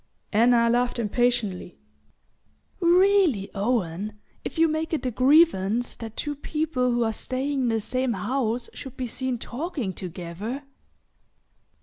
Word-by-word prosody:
Anna 235 +2 +5
laughed 245 +1 +1
impatiently. 230 - 0 1.0
"Really, 355 - +4
Owen, 205 -2 -1 0.3
if - - -6
you 330 0 +5
make 315 +1 -2
it 310 - -1
a 255 - 0
grievance 245 - +3
that 225 -1 -8
two 295 - -2
people 295 -3 -1
who 240 0 +2
are 225 -1 0
staying 265 +4 -2
in 250 - +1
the 225 -1 +1
same 255 +3 -1
house 235 +3 -1
should 265 -3 -9
be 255 - -2
seen 255 +1 -2
talking 255 - -4
together 185 - -6
245 Hz, 130 wpm, -25 LUFS, 215-280 Hz, 1.0 s, Anna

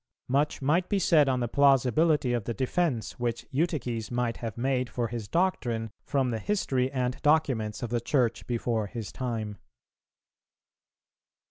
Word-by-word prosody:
Much 140 +2 0
might 170 +6 +2
be 205 - +2
said 155 -6 +4
on 130 -1 +1
the 120 - 0
plausibility 140 +1 +3
of 120 -4 -1
the 115 - -3
defence, 130 - -1
which 120 -1 -2
Eutyches 130 -7 -1
might 120 -1 -1
have 115 -2 -5
made 125 0 0
for 120 -2 -2
his 115 -3 -5
doctrine 120 - 0
from 135 -3 0
the 115 - -2
history 130 - 0
and 125 -2 -2
documents 130 -9 +1
of 120 - -4
the 120 -1 0
Church 120 -3 0
before 115 -3 -1
his 115 -1 -6
time. 110 -5 -4
125 Hz, 150 wpm, -28 LUFS, 115-140 Hz, -, said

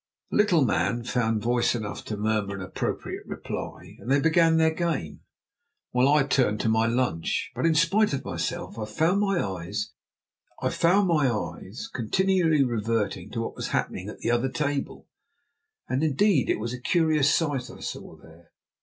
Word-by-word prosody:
The - - 0
little 180 -9 +4
man 120 +1 0
found 115 -3 0
voice 120 +1 +2
enough 105 -4 -5
to 105 - -4
murmur 105 -1 -1
an 100 - -6
appropriate 95 - -4
reply, - - -7
and - - -8
they 140 +1 +4
began 165 +1 +4
their 160 0 +3
game, 160 - -2 0.7
while 125 +1 +3
I 145 0 +5
turned 125 -6 +1
to 115 - +1
my 110 +1 +3
lunch. 115 -9 -1
But, - - 0
in 165 - +3
spite 195 +7 +3
of 140 - -3
myself, 110 - -4
I 110 - -2
found 160 - +1
my 195 -2 +1
eyes 100 - -3 2.0
continually 165 - +2
reverting 115 -3 -1
to - - -3
what - - -5
was - - -4
happening 95 +2 -2
at - - -8
the 115 - 0
other 120 +2 +1
table. 145 0 -3 0.8
And, 130 +4 0
indeed, 155 - +2
it - - +2
was 115 +2 -3
a 125 - -7
curious 155 -1 +3
sight 140 -6 0
I - - -11
saw - - -6
there. 80 +1 -18
125 Hz, 165 wpm, -26 LUFS, 110-160 Hz, 2.0 s, I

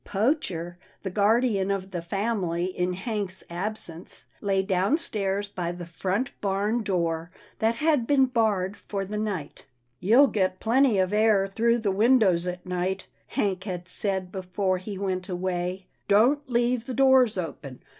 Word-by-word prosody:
Poacher, 190 - -1 0.2
the 190 - -3
guardian 210 0 +2
of 195 -1 -2
the 175 -2 -3
family 180 -2 -1
in 180 -1 -1
Hank's 195 -1 -3
absence, 175 -2 -3 0.2
lay 195 -2 +1
downstairs 200 - 0
by 175 -4 -3
the 175 0 -7
front 190 +8 -2
barn 205 +4 0
door 170 -5 -1 0.3
that 225 +1 +2
had 295 -3 +1
been 275 -2 +5
barred 215 -6 0
for 200 -1 -4
the 210 +2 -4
night. 195 -9 -4 0.2
" 120 +1 -46
You'll 230 - +6
get 190 -7 0
plenty 240 -1 +3
of 185 +1 +1
air 210 -2 +4
through 230 +4 +1
the 220 -4 0
windows 200 -5 +3
at 180 0 -5
night," 185 +1 -2 0.2
Hank 195 -1 -1
had 180 -3 -5
said 190 -1 -1
before 185 0 -1
he 195 +1 -6
went 185 -1 -3
away. 180 0 -2
" - - -45
Don't 255 +8 +3
leave 240 0 +1
the 255 - -4
doors 265 -5 +5
open. 150 -6 -6
195 Hz, 155 wpm, -26 LUFS, 180-225 Hz, 0.3 s, You'll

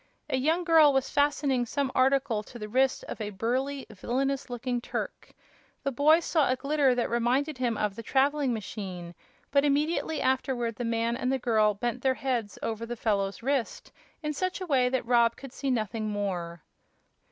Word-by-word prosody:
A 260 - +2
young 320 +7 +1
girl 320 -3 +6
was 270 -1 0
fastening 285 -3 +2
some 280 +1 -1
article 265 -4 +2
to 240 - -12
the 210 -2 -6
wrist 260 +4 +1
of - - -6
a 210 - -2
burly, 255 +7 -2
villainous 265 +7 -2
looking 245 0 -2
Turk. - - -5 0.5
The 275 - 0
boy 305 +6 +5
saw 315 -4 +2
a 255 - +3
glitter 275 -1 +2
that 245 - 0
reminded 255 +5 0
him 240 -4 0
of 210 -2 -1
the 230 - -6
traveling 275 +3 +1
machine, 190 -5 -5 0.4
but 280 0 +4
immediately 300 +2 +1
afterward 250 -3 0
the 245 - -3
man 230 0 0
and 250 +1 -1
the 270 - +1
girl 215 -4 +2
bent 240 +4 -3
their 260 0 +2
heads 245 -7 -2
over 225 0 -3
the 240 +1 -5
fellow's 200 -1 -1
wrist 270 -2 -2 0.3
in 300 0 -1
such 370 +6 -2
a 370 - -4
way 260 -6 +2
that 260 -2 -1
Rob 235 -1 +3
could 270 -2 -11
see 275 0 -3
nothing 220 -2 -1
more. 180 -5 -3
250 Hz, 185 wpm, -28 LUFS, 230-275 Hz, 0.5 s, girl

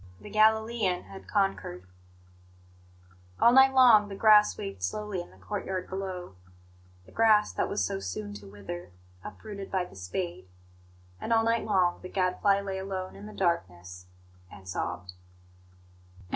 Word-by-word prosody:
The 210 - -11
Galilean 220 -3 +2
had 195 - -12
conquered. 195 - -1 1.5
All 235 - +6
night 265 +1 +7
long 235 -6 +6
the 195 - -6
grass 210 0 +5
waved 100 -1 -6
softly 200 - -3
in 175 - -11
the - - -19
courtyard 190 -3 -4
below 185 - -5 0.7
the - - -17
grass 215 -2 +4
that - - -1
was 95 - 0
so 95 - -3
soon 100 +2 -5
to 100 0 -14
wither, 90 -3 -8 0.3
uprooted 200 -3 -8
by 185 -2 -1
the - - -15
spade; 170 - -5 0.7
and - - -5
all 225 -1 +4
night 230 0 +1
long 185 -4 +1
the 185 - -8
Gadfly 195 +2 +1
lay 195 -1 -4
alone 190 -1 -5
in 205 - -10
the - - -9
darkness, 90 - -2 0.4
and 95 -1 -13
sobbed. 90 0 -4
190 Hz, 145 wpm, -28 LUFS, -, 1.5 s, night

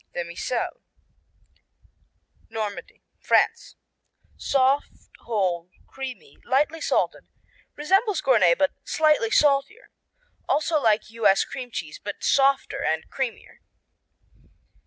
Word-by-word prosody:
Demi 170 -1 -5
Sel 240 +6 -3 1.7
Normandy, 215 -2 -6 0.2
France - - +1 0.6
Soft, 275 +1 0
whole, 185 -6 -2 0.2
creamy, 255 - -9
lightly 300 +5 0
salted, - - -1 0.5
resembles 385 +6 +1
Gournay 190 -10 +4
but 285 - +1
slightly 305 -7 +2
saltier; 295 - +1 0.6
also 305 +1 +1
like 220 -2 +1
U.S. 210 -4 +3
cream 250 -2 -7
cheese, - - -6
but - - -7
softer 275 0 +2
and 160 0 -1
creamier. 260 -4 -5
260 Hz, 95 wpm, -24 LUFS, 210-290 Hz, 1.7 s, Gournay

